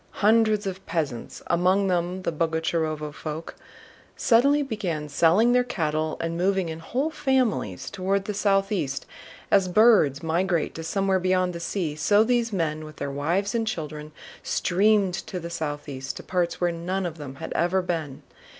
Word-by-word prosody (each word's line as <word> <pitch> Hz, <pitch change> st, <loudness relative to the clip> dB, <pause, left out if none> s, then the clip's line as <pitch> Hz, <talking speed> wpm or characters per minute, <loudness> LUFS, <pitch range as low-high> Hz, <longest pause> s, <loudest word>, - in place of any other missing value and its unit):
Hundreds 215 Hz, -1 st, +4 dB
of 190 Hz, 0 st, -5 dB
peasants, 145 Hz, -8 st, -3 dB
among 185 Hz, +3 st, +2 dB
them 180 Hz, 0 st, -1 dB
the -, -, 0 dB
Boguchárovo 160 Hz, -1 st, -1 dB
folk, 155 Hz, +1 st, -6 dB, 0.6 s
suddenly 280 Hz, +5 st, +4 dB
began 185 Hz, -, -3 dB
selling 170 Hz, +10 st, +4 dB
their 250 Hz, 0 st, +4 dB
cattle 155 Hz, -8 st, -2 dB
and 165 Hz, 0 st, -2 dB
moving 185 Hz, 0 st, +1 dB
in 160 Hz, 0 st, -6 dB
whole 265 Hz, -, -2 dB
families 260 Hz, -, 0 dB
toward 195 Hz, 0 st, -1 dB
the 210 Hz, -, -3 dB
southeast. 195 Hz, -8 st, 0 dB, 0.5 s
As 195 Hz, -2 st, +4 dB
birds 180 Hz, -, +4 dB
migrate 170 Hz, 0 st, 0 dB
to 165 Hz, -, -7 dB
somewhere 190 Hz, +3 st, +1 dB
beyond 185 Hz, 0 st, +1 dB
the 170 Hz, -, -6 dB
sea, 170 Hz, -3 st, -2 dB
so 205 Hz, +7 st, +4 dB
these 235 Hz, 0 st, +1 dB
men 155 Hz, -5 st, -1 dB
with 155 Hz, 0 st, -10 dB
their 140 Hz, 0 st, -4 dB
wives 170 Hz, -, -1 dB
and 225 Hz, -1 st, 0 dB
children 150 Hz, -6 st, -5 dB, 0.3 s
streamed 195 Hz, +1 st, +2 dB
to 180 Hz, 0 st, -5 dB
the 170 Hz, 0 st, -7 dB
southeast, 145 Hz, -4 st, -4 dB
to -, -, -8 dB
parts 180 Hz, -2 st, -1 dB
where 175 Hz, -1 st, +1 dB
none 180 Hz, +3 st, -3 dB
of 165 Hz, -2 st, -5 dB
them 140 Hz, -2 st, -7 dB
had -, -, -6 dB
ever 180 Hz, +3 st, +1 dB
been. 160 Hz, -6 st, -4 dB
180 Hz, 160 wpm, -25 LUFS, 155-200 Hz, 0.6 s, Hundreds